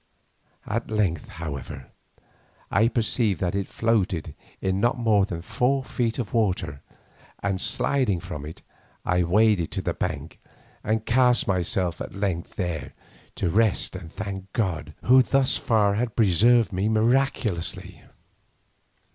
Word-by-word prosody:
At 115 +3 -3
length, 105 -6 0
however, 75 -4 -7 0.8
I 110 +3 +4
perceived 115 -3 +1
that 90 -2 0
it 100 -1 -2
floated 100 -9 0 0.3
in 95 0 0
not 120 +6 +2
more 110 -4 +3
than 85 -2 -5
four 125 +6 +1
feet 120 -3 -2
of 120 -7 -4
water, 95 - 0 0.6
and 95 -1 0
sliding 125 -10 +1
from 90 -5 -7
it, 75 +2 -9 0.4
I 90 0 +2
waded 95 0 +3
to - - -1
the - - -1
bank - - -4 0.4
and 110 0 -1
cast 125 0 +3
myself 90 -2 0
at - - -6
length 95 -4 -3
there 85 -5 -4 0.4
to 90 - -1
rest 110 -2 +2
and 85 -3 -8
thank 95 -2 -6
God 95 -10 -2
who 130 +1 +7
thus 135 +1 +2
far 105 -3 +2
had 115 +1 -2
preserved 115 +2 +4
me 95 +4 0
miraculously. 110 -5 0
100 Hz, 135 wpm, -25 LUFS, 90-115 Hz, 0.8 s, who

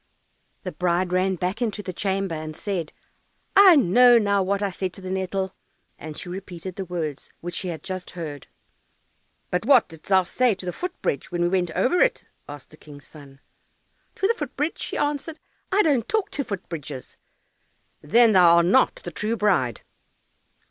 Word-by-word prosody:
The - - -4
bride 180 0 0
ran 185 +1 +2
back 185 +6 -3
into 215 -3 -2
the 185 - -5
chamber, 195 -1 -2
and 155 -1 -6
said, 180 -6 -3 0.6
"I 390 -3 +9
know 245 - +6
now 200 -3 +2
what 200 +2 0
I 200 - 0
said 185 0 -4
to - - -10
the 185 0 -6
nettle," 190 0 -2 0.5
and 155 -1 -8
she - - -7
repeated 180 -1 -7
the 195 - -5
words 160 -5 -5
which 175 +1 -6
she 185 - -4
had 160 -4 -5
just 185 -1 -5
heard. 145 -5 -6 1.0
"But 180 - 0
what 255 -1 +5
didst 160 -2 -13
thou 190 -1 +4
say 235 +4 +1
to 185 - -9
the 180 - -3
foot 360 0 -6
bridge 140 - -2
when 175 -1 -1
we 175 - +2
went 180 -1 0
over 355 +8 +2
it?" - - +2 0.2
asked 145 -2 -10
the 155 - -15
King's 145 -2 -14
son. 140 -2 -15 0.7
"To 390 - +1
the 460 - +3
foot 295 - -6
bridge?" 295 +4 -1
she - - -4
answered. 295 +2 -2 0.3
"I 410 +2 +4
don't 270 -8 +1
talk 435 -2 0
to 280 - -2
foot 200 -7 -6
bridges." 145 -5 -8 0.9
"Then 230 +10 +5
thou 175 -4 +6
art 170 0 +4
not 230 +9 +4
the 175 - -6
true 215 +7 -2
bride." 175 - +1
190 Hz, 190 wpm, -24 LUFS, 170-230 Hz, 1.0 s, I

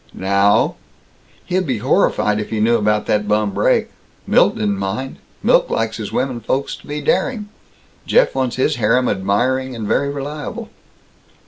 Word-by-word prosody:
Now: 100 +2 +2 0.7
"He'd 185 -1 -1
be 130 -4 0
horrified 105 - +1
if 105 - -5
he 110 - -2
knew 115 +2 +3
about 105 -1 +1
that 105 0 0
bum 105 -1 +1
brake. - - +1 0.3
Milt - - +3
didn't 100 -2 -1
mind. 110 +8 -4 0.3
Milt - - +3
likes 115 0 -1
his 105 -2 -6
womenfolks 130 +2 -2
to - - -18
be 150 +1 -4
daring. 235 - 0 0.6
Jeff - - +3
wants 130 -2 -1
his 130 +2 0
harem 120 +3 +2
admiring 125 +7 0
and 110 -3 -5
very 140 +5 +1
reliable." 145 +1 -6
115 Hz, 150 wpm, -19 LUFS, 105-135 Hz, 0.7 s, knew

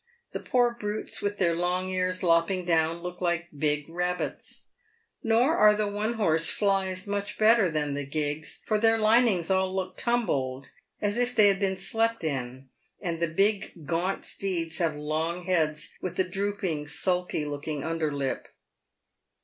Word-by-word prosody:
The - - -4
poor 245 -1 +2
brutes, 210 +1 -3
with 205 0 -2
their 175 -3 +2
loug 180 +2 0
ears 185 0 -1
lopping 170 +2 +2
down, 165 0 +1
look 180 0 -6
like 175 -1 0
big 150 0 0
rabbits. 180 +2 -3 0.6
Nor 240 +7 +3
are 210 -8 +6
the 215 0 0
one 210 +3 -1
horse 165 -8 +2
fiys 190 -2 0
much 205 0 -3
better 220 -3 +5
than 150 -2 -1
the 140 -1 -4
gigs, 150 +1 -2
for 215 -1 +1
their 225 +1 +4
linings 215 -5 +3
all 190 0 +1
look 185 -1 -3
tumbled, 140 - -1 0.3
as 205 +1 0
if 245 0 0
they 210 -2 +7
had 195 -1 +1
been 190 -1 0
slept 225 +3 -1
in, 130 -3 -3 0.3
and 170 -2 -3
the 170 - +1
big 195 -2 0
gaunt 175 +5 -1
steeds 175 -4 -1
have 165 -3 +1
long 160 +4 -2
heads, 160 -5 0
with 185 - -4
a 185 - +3
drooping, 185 -5 -2
sulky 180 0 -1
looking 145 0 -4
under 165 -2 -1
lip. 140 -2 -3
180 Hz, 160 wpm, -27 LUFS, 160-205 Hz, 0.6 s, they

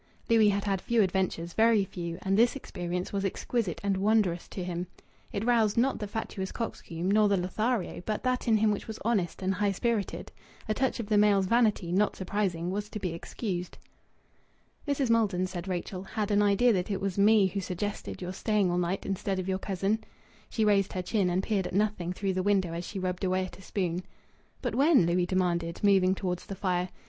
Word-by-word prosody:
Louis 220 -2 +6
had 200 0 0
had 195 -2 -1
few 235 -2 +3
adventures, 180 -3 -1
very 220 -2 +4
few, 170 -2 -5
and 195 0 +1
this 235 +5 +4
experience 180 -8 -4
was 200 -1 -1
exquisite 200 -1 -2
and 200 -1 +1
wondrous 195 -4 +2
to 185 - -6
him. 175 0 -3 0.4
It 205 +1 -3
roused, 230 -4 +3
not 260 +3 +2
the 210 - -4
fatuous 200 -2 -4
coxcomb, 180 -6 -3
nor 210 0 +4
the 200 - +3
Lothario, 215 +3 -1
but 215 +1 -3
that 255 0 0
in 225 -2 +5
him 215 0 +3
which 205 - -3
was 220 -1 -6
honest 195 -6 0
and 190 +1 +1
high 205 +1 +1
spirited. 215 +1 -2 0.4
A 215 - +1
touch 260 +2 0
of 230 - -2
the 210 0 +3
male's 205 -2 +4
vanity, 215 -5 +2
not 205 +3 +2
surprising, 185 -3 -2
was 205 +2 -3
to 215 - -5
be 180 -4 -3
excused. 180 +1 -5 1.1
"Mrs. 280 -4 +1
Maldon," 205 -5 +2
said 185 -1 -6
Rachel, 185 0 -3
"had 210 +2 -3
an 205 0 +4
idea 205 +4 +4
that 180 -1 -1
it 200 - -1
was 195 -1 -2
me 210 0 +6
who 190 +1 -2
suggested 190 +1 -4
your 180 +1 -4
staying 205 -2 +1
all 175 - +1
night 180 +2 -1
instead 195 0 -2
of 185 0 -3
your 190 0 0
cousin." 195 +3 -1 0.5
She 220 - 0
raised 200 -2 +3
her 185 - -2
chin, 195 -1 +1
and 180 +2 0
peered 200 -4 0
at - - -6
nothing 205 -4 0
through 190 +1 -2
the 185 - 0
window 190 -3 +1
as 170 +1 -4
she 205 - -6
rubbed 185 -1 -3
away 185 0 +1
at 185 - -11
a - - -12
spoon. 180 -2 -2 0.6
"But - - -1
when?" 280 - +5
Louis 175 +1 +1
demanded, 175 -2 0
moving 190 -2 +4
towards 180 -2 -3
the 195 - -5
fire. 180 -2 -1
195 Hz, 210 wpm, -29 LUFS, 180-215 Hz, 1.1 s, Louis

